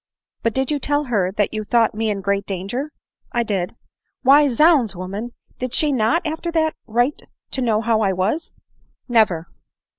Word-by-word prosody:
" - - -64
But 230 -1 -1
did 265 +1 0
you 295 - 0
tell 290 +1 0
her 205 -9 0
that 205 +1 0
you 215 0 -2
thought 230 +1 +2
me 220 +1 -1
in 200 -2 -2
great 200 +1 -1
danger 205 +10 -4
?" - - -71
" - - -41
I 240 - +1
did." 195 -3 -2 0.2
" - - -55
Why, 285 +3 +6
zounds, 270 - +4
woman! 200 +7 -5 0.3
did 255 -1 -3
she 300 -2 +2
not, 265 +8 +1
after 320 +2 -3
that, 315 -1 +2
write 240 +5 +1 0.3
to 265 - -2
know 220 -3 +2
how 225 -1 +1
I 195 -2 +2
was?" 190 - -1 0.3
" - - -36 0.2
Never." 215 -9 +2
230 Hz, 205 wpm, -21 LUFS, 205-280 Hz, 0.3 s, Why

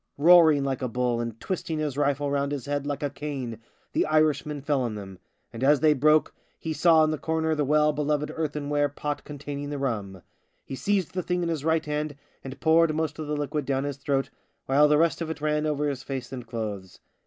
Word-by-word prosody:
Roaring 160 -2 +6
like 135 -1 -2
a 130 - 0
bull 120 0 0
and 115 -1 -5
twisting 165 +2 -3
his 150 -3 -2
rifle 145 0 0
round 140 0 0
his 140 -3 -4
head 145 0 -2
like 145 0 -3
a 145 - 0
cane, 130 -7 -5 0.3
the - - +2
Irishman 155 -1 +1
fell 140 -1 0
on 120 -3 -2
them 95 -3 -9 0.2
— - - -45
and 115 +2 -5
as 145 +1 +5
they 155 -1 +5
broke, 150 +2 +3 0.3
lie 160 - -1
saw 160 +1 +5
in 155 - +2
the 155 - -3
corner 160 0 0
the 150 -1 0
well 150 +1 +3
beloved 150 0 -1
earthen 150 -2 -3
ware 145 0 +2
pot 145 +1 -4
containing 145 0 -6
the 145 - -3
rum. 105 -9 -3 0.4
He - - -8
seized 195 +5 0
the 185 - -1
thing 180 0 -1
in 170 - -1
his 160 -4 -2
right 160 0 +1
hand 150 0 -2 0.3
and 135 0 -8
poured 160 0 +4
most 155 -1 -2
of 155 - -4
the 150 0 -2
liquid 145 +1 -2
down 135 -1 0
his 145 -1 -4
throat, 135 -1 -1 0.3
while 145 +3 +5
the 150 0 +4
rest 165 +2 +2
of 165 - -3
it 160 - -4
ran 150 0 0
over 150 -1 0
his 140 -3 -3
face 130 -3 -5
and 125 -3 -7
clothes. 105 -5 -5
145 Hz, 230 wpm, -26 LUFS, 135-155 Hz, 0.4 s, Roaring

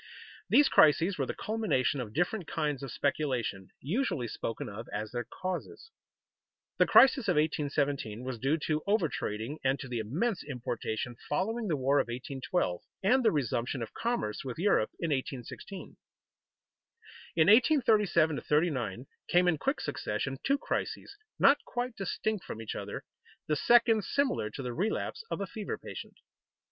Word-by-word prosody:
These 290 - +6
crises 160 +5 +4
were - - 0
the - - -3
culmination 210 - 0
of 110 -4 -6
different 175 - -1
kinds 150 -4 -1
of 135 - -6
speculation, 125 -9 -1
usually 155 - -1
spoken 115 0 -4
of 110 +3 -7
as 105 +1 -4
their 120 -1 -3
causes. 185 - -6 0.9
The - - +5
crisis 265 -3 +6
of 180 - +4
1817 145 -6 0
was 130 -2 -4
due 135 +7 +1
to 155 -1 0
over 200 -4 +3
trading 115 +2 -4
and 135 +1 +2
to 135 - -6
the 120 -2 -3
immense 170 - -1
importation 120 -3 -4
following 220 +8 -1
the 160 -5 +1
war 135 +2 +3
of - - +2
1812 130 - -2 0.2
and 255 +7 +4
the - - +5
resumption 125 -3 -1
of 110 - -8
commerce 230 - -2
with 130 -3 -5
Europe 200 +5 +2
in 165 -2 -1
1816. 135 +7 -5 1.4
In 160 - +5
1837 210 - +4
39 130 - 0 0.2
came 180 +1 +4
in 160 -4 +2
quick 270 - 0
succession 130 +6 -3
two 275 +1 +2
crises, 400 - -3 0.2
not 280 +1 +6
quite 245 -1 -3
distinct 200 +1 -2
from - - -7
each 115 - -5
other, - - -6 0.4
the 150 - +1
second 230 +4 +4
similar 265 - 0
to 135 - -7
the 125 -1 -3
relapse 210 - -2
of - - -3
a - - 0
fever 210 +1 -5
patient. - - -9
150 Hz, 155 wpm, -30 LUFS, 125-205 Hz, 1.4 s, These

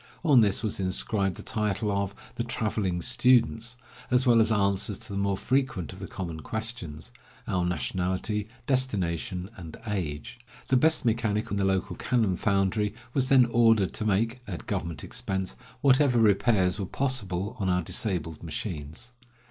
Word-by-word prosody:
On 140 -6 +7
this 100 0 +2
was 110 - -2
inscribed 95 0 -1
the - - -9
title 105 -1 -1
of 100 0 -1 0.2
"The 120 - -2
Traveling 105 -6 -1
Students," 120 -1 +2 0.3
as 125 +1 +3
well 120 -2 +6
as 110 0 +2
answers 100 -1 +1
to - - -9
the 100 - -1
more 100 -1 0
frequent 130 - -1
of 95 - -11
the 95 - -6
common 85 -4 -5
questions 110 -6 -4 0.2
— - - -27
our 90 -1 0
nationality, 90 - -1 0.2
destination, 95 - 0
and 85 -3 -9
age. 90 -2 -4 0.3
The 130 - +4
best 155 +2 +3
mechanic 110 -2 0
in 100 - 0
the 100 - +1
local 95 -1 0
cannon 115 -7 +1
foundry 100 +2 +1 0.2
was 130 -2 +1
then 130 -2 +7
ordered 115 -4 +3
to - - -3
make, 110 +4 +1
at 90 -4 -6
government 85 0 -3
expense, 95 -1 -3 0.3
whatever 135 -2 +4
repairs 100 -3 +3
were 95 - -2
possible 105 -8 -2
on 95 -2 0
our 90 -1 +2
disabled 80 -5 -2
machines. 80 - -6
100 Hz, 160 wpm, -27 LUFS, 95-115 Hz, 0.3 s, On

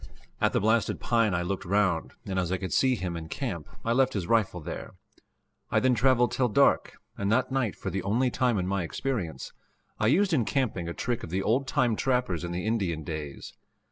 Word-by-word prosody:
At - - +3
the - - +3
blasted 110 +2 +1
pine 115 -5 +2
I 90 - 0
looked 95 +2 -3
round, 95 -3 +1
and 95 -1 -1
as 90 -1 -1
I 95 - +1
could 95 0 -4
see 130 -1 +3
him 90 -5 -4
in 80 -1 -6
camp, 95 - -4 0.2
I 115 - +2
left 130 +1 +3
his 95 -5 -2
rifle 105 -3 +1
there. 75 - -7 0.7
I - - +3
then 130 0 +3
traveled 125 -1 +3
till 125 - +1
dark, 105 - +3 0.3
and 100 0 0
that 130 +3 +2
night, 130 -6 0
for - - -5
the 95 - -2
only 120 +7 +1
time 125 -4 +1
in 90 - 0
my 100 0 0
experience, 90 0 -3 0.5
I 110 - +2
used 185 - +3
in 130 -7 +3
camping 110 - -1
a 85 - -5
trick 120 -1 -2
of - - -7
the 95 +3 -1
old 130 +6 +1
time 120 -4 +2
trappers 125 - 0
in 85 - -4
the 90 +2 -3
Indian 95 -8 -1
days. 75 -2 -6
105 Hz, 215 wpm, -28 LUFS, 90-125 Hz, 0.7 s, At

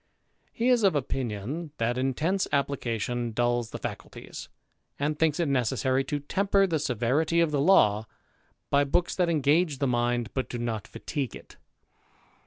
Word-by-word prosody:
He 235 +2 0
is 245 -2 +4
of 195 -6 +3
opinion, 135 +3 -3
that 115 +1 0
intense 150 +9 0
application 120 -4 -1
dulls 120 0 0
the - - -6
faculties, - - -8 0.5
and 150 +1 -1
thinks 160 -1 +2
it 170 - +1
necessary 130 0 +1
to 145 +1 -2
temper 195 +6 +2
the 165 -4 0
severity 140 +6 +1
of 165 -2 +3
the 145 -2 +1
law 110 - +4 0.6
by 140 0 +4
books 175 +5 0
that 180 -2 +1
engage 155 0 +2
the 140 - 0
mind, 120 -3 0
but 130 - -2
do 120 - -4
not 115 -3 -3
fatigue 135 -5 -4
it. - - -13
140 Hz, 155 wpm, -27 LUFS, 120-160 Hz, 0.6 s, is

